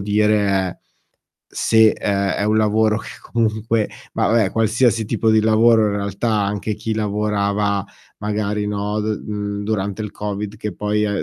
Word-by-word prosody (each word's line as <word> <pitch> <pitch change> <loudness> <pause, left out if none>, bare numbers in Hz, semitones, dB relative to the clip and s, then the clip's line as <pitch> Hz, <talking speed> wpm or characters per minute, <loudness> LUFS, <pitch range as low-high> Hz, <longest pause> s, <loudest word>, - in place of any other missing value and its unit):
dire 105 +1 +2
è, 95 -2 0 0.7
se 110 -1 +3
è 100 -1 -1
è - - -1
un 110 +1 +2
lavoro 110 0 +2
che - - -8
comunque 110 -1 0 0.3
ma - - +1
vabbè, 110 -5 +2
qualsiasi 115 0 +2
tipo 110 +1 0
di 110 - +5
lavoro 110 0 +4
in 100 - -1
realtà, 100 +3 -2
anche 100 +1 -2
chi 110 +2 -3
lavorava 105 -1 0 0.3
magari, 105 0 -2
no, 105 +1 -2
d 105 0 -2
mhmm, 105 -1 -4
durante 100 -1 -2
il 105 -2 -5
Covid 105 0 -5
che 105 -2 -4
poi 105 +2 0
è 100 -1 -1
105 Hz, 160 wpm, -20 LUFS, 100-110 Hz, 0.7 s, di